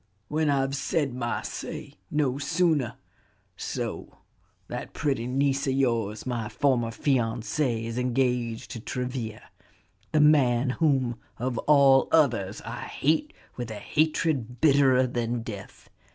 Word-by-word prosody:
"When 155 0 +1
I've 135 -1 +1
said 140 0 -1
my 120 -1 -2
say; - - -6 0.2
no 140 -3 0
sooner. 145 -5 +1 0.6
So - - -5 0.5
that - - -6
pretty 135 -6 -1
niece 140 +2 +1
of 135 - +2
yours, 115 -6 0
my 120 -4 -2
former 120 -1 +1
fiancée, 120 -1 0
is 115 +1 -3
engaged 125 -2 0
to 115 - -5
Travilla? 125 -2 -4 0.7
the 155 - +3
man 135 -4 +4
whom, 130 -6 +1 0.2
of 120 0 -2
all 140 -2 +6
others, 120 -12 +2
I - - -6
hate 160 - 0 0.3
with 120 -2 -4
a 110 - -5
hatred 145 -2 0
bitterer 135 -3 +5
than 120 -1 -2
death. 100 -4 -9
130 Hz, 125 wpm, -27 LUFS, 120-140 Hz, 0.7 s, all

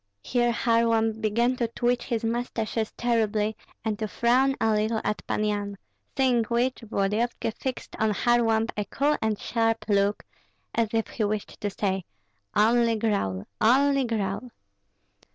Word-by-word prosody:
Here 240 -1 +1
Kharlamp 230 -2 +2
began 235 +4 +1
to 235 - 0
twitch 240 +2 0
his 235 -2 -2
mustaches 225 -1 -2
terribly, 220 -3 +1 0.3
and 215 -1 -1
to 215 - -1
frown 255 +5 +2
a 225 - +2
little 215 +1 +1
at 210 - -1
Pan 215 - 0
Yan; 205 -1 -2 0.4
seeing 255 -3 +3
which, 245 +3 0
Volodyovski 220 +2 -1
fixed 260 +3 -5
on 220 - +2
Kharlamp 225 0 +2
a 210 - -2
cool 290 +7 +1
and 220 -1 0
sharp 225 -1 0
look, 200 0 +2 0.5
as 230 -2 +1
if 225 -1 +1
he 225 - -2
wished 210 0 -3
to 205 - -1
say, 195 -1 -1 0.5
"Only 230 +2 +4
growl, 200 - -1 0.2
only 275 +4 +4
growl!" 220 +1 -2
225 Hz, 145 wpm, -26 LUFS, 210-240 Hz, 0.5 s, Only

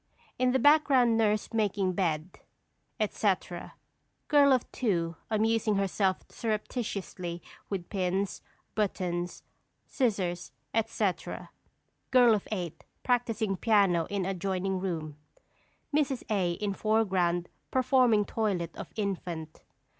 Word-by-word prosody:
In 255 0 +3
the 265 - +3
background 265 -4 +5
nurse 215 0 +1
making 200 -4 +1
bed, 170 -2 -1 0.6
etc.; 195 -4 -1 0.5
Girl 285 -1 +6
of 255 -2 +3
Two 170 -8 0
amusing 220 0 +2
herself 195 -1 +1
surreptitiously 205 -6 -4 0.3
with 185 -4 -3
pins, 190 0 -1 0.3
buttons, 180 -4 -2 0.4
scissors, 190 -9 -1 0.2
etc.; 215 -3 -1 0.6
Girl 245 -3 +6
of 210 - -1
Eight 175 -6 -4 0.2
practising 230 -5 +1
piano 195 -7 +3
in 200 -2 -1
adjoining 190 0 -1
room; 160 -5 -4 0.8
Mrs. 275 -4 +1
A. 185 -4 +1
in 200 +3 -2
foreground 190 -5 +1 0.2
performing 255 -5 +3
toilet 190 -8 -1
of - - -7
infant. 175 -6 -4
200 Hz, 100 wpm, -29 LUFS, 180-225 Hz, 0.8 s, Girl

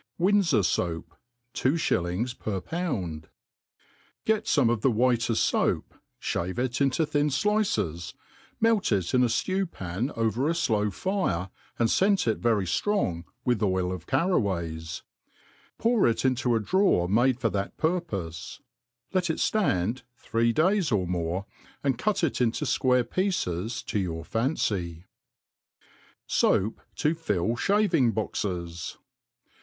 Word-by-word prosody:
U^ndfor 185 - +3
Soap. 85 -2 -2 0.4
^Two 135 +6 +1
Shillings 95 - 0
per 105 -5 -3
Found. 95 - -3
• - - -22
• - - -35 0.5
» - - -35
GET 220 0 +1
fome 140 - +3
of 120 -3 -1
the 135 - +4
whiteft 120 0 +2
fpap, - - +1 0.6
(have 95 - -5
it 125 +2 -1
into 140 +4 +2
thin 145 0 +1
fl/ces; 135 - 0 0.4
melt 225 - +2
it 95 -5 0
in 125 - +4
a 120 - +3 0.2
(lew 190 0 0
pan 100 - -4
over 115 +5 +1
a - - +2
flpw 110 -11 +1
fire, 100 - -1 0.3
and 115 - +3
fcent 195 0 +3
it 110 - +1
very 115 -5 +2
firong 90 - 0 0.2
with 120 -4 +1
oil 95 -3 +1
of 90 -3 -6
carraways; 85 - -1 0.7
pour 230 -2 +3
it 115 +2 0
into 130 -2 +2
a - - +2
drawer 180 - +2
made 120 +6 +3
for 115 -4 0
that 100 0 -3
purpofe; 100 - -3 0.5
let 185 -2 +1
it 160 - 0
(tand 125 - +1 0.2
three 115 -1 +1
days 175 - +2
or 100 -4 +2
more, 90 +2 -2 0.4
and 135 -4 0
cut 215 -4 0
it 150 -5 0
into 120 +5 +1
fquarc 125 -3 +2
pieces 120 - -1
to 105 - -2
your 80 -4 -3
fancy. 95 - -1 1.4
&oap 105 +4 +2 0.2
to 150 - +1
fill 115 - -1
Shaving' 170 - +2
Boxes. 85 -6 -3
115 Hz, 140 wpm, -27 LUFS, -, 1.4 s, the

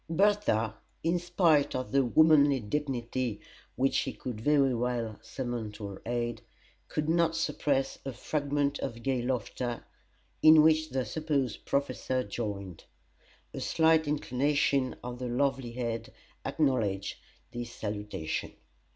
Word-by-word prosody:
Bertha, 165 - +2 0.3
in 170 +2 +2
spite 175 -4 +3
of 130 0 -3
the 135 0 +4
womanly 145 +1 +5
dignity 125 -2 -2 0.4
which 135 +2 +2
she - - 0
could 120 -4 -6
very 140 0 +3
well 120 -3 -2
summon 120 -5 -4
to 105 0 -7
her 95 - -9
aid, 120 -1 -2 0.5
could 150 - -2
not 165 0 +2
suppress 140 -4 0
a 135 - -4
fragment 145 +2 -1
of 115 -3 -5
gay 130 -2 0
laughter, 120 -1 -3 0.6
in 155 -1 +8
which 155 0 +4
the 130 -2 -1
supposed 140 -1 -2
Professor 130 -2 0
joined. 100 -5 -5 0.7
A - - -5
slight 160 -1 +3
inclination 140 -1 +1
of 125 0 -6
the 125 - -3
lovely 130 -1 0
head 115 -2 -3 0.3
acknowledged 110 -10 0 0.3
his 120 0 -5
salutation. 105 -8 -4
130 Hz, 125 wpm, -30 LUFS, 115-150 Hz, 0.7 s, in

